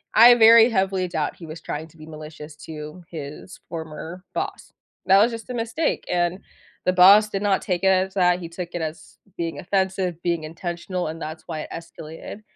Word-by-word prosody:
I 235 +2 +9
very 230 0 +8
heavily 190 -3 0
doubt 160 -4 -2
he 170 - -11
was 160 +1 -9
trying 155 +2 -5
to 165 - -22
be 155 - -11
malicious 155 -1 -10
to 155 +2 -8
his 150 +3 -8
former 165 +2 -7
boss. - - -4 0.3
That 190 +1 +6
was 230 +3 +4
just 230 +1 -8
a - - -3
mistake, 235 +7 -1
and 175 +1 0 0.5
the 185 - +3
boss 200 +4 +7
did 195 -1 -3
not 200 -2 +2
take 180 -1 -2
it - - +4
as 190 0 +2
that, 180 -2 +3
he 170 - -6
took 170 +1 -6
it 175 - -3
as 160 0 -7 0.2
being 165 -4 -3
offensive, 190 -2 -1
being 170 -2 0
intentional, 175 +2 -4
and 160 +1 -6
that's 155 +1 -6
why 160 -2 -4
it - - -8
escalated, 165 +4 -9
175 Hz, 195 wpm, -23 LUFS, 160-190 Hz, 0.5 s, I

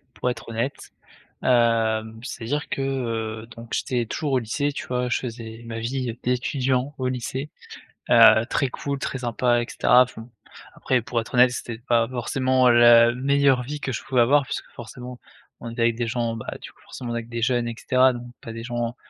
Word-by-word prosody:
pour 125 - -1
être 120 - -9
honnête. 115 +4 -4 0.5
Hem, 110 -2 +2
c'est-à-dire 130 +3 -4
que, 135 - -3
heu, 115 -4 -3
donc 115 0 -11
j'étais 125 -3 -1
toujours 140 +5 -3
au 130 - +3
lycée, 125 +5 -1
tu - - -6
vois? 125 0 -1
Je 120 - +1
faisais 115 -2 -7
ma 115 -1 -6
vie 120 +1 -3
d'étudiant 130 +2 0
au 130 -1 -1
lycée. 130 +3 -4 0.6
Heu, 115 -1 +7
très 135 - 0
cool, 140 +2 -4
très 135 0 -4
sympa 120 0 +1
et - - -3
cetera, 125 +1 +5
enfin. 120 -2 -10 0.4
Après, 130 -2 0
pour 120 0 -2
être 115 - -7
honnête, 125 0 +6
c'était 120 -2 -6
pas 115 -1 +1
forcément 130 +1 +1
la 120 0 +7
meilleure 135 0 +2
vie 145 +4 -6
que 135 - -2
je 115 - -4
pouvais 125 -2 +2
avoir 140 +4 +4
puisque, - - -5
forcément, 125 +1 -9 0.4
on 115 - -7
est 115 - -9
avec 115 0 +2
des 120 -1 -1
gens, 115 0 -1
bah, 110 - -9
du - - -10
coup, - - -30
forcément 120 -2 -7
avec 115 0 -4
des 120 0 -5
jeunes 120 0 +1
et 115 - -4
cetera, 130 -1 +3
donc 120 0 -8
pas 115 - -9
des 115 0 -7
gens, 120 0 -3
120 Hz, 200 wpm, -24 LUFS, 115-130 Hz, 0.6 s, Heu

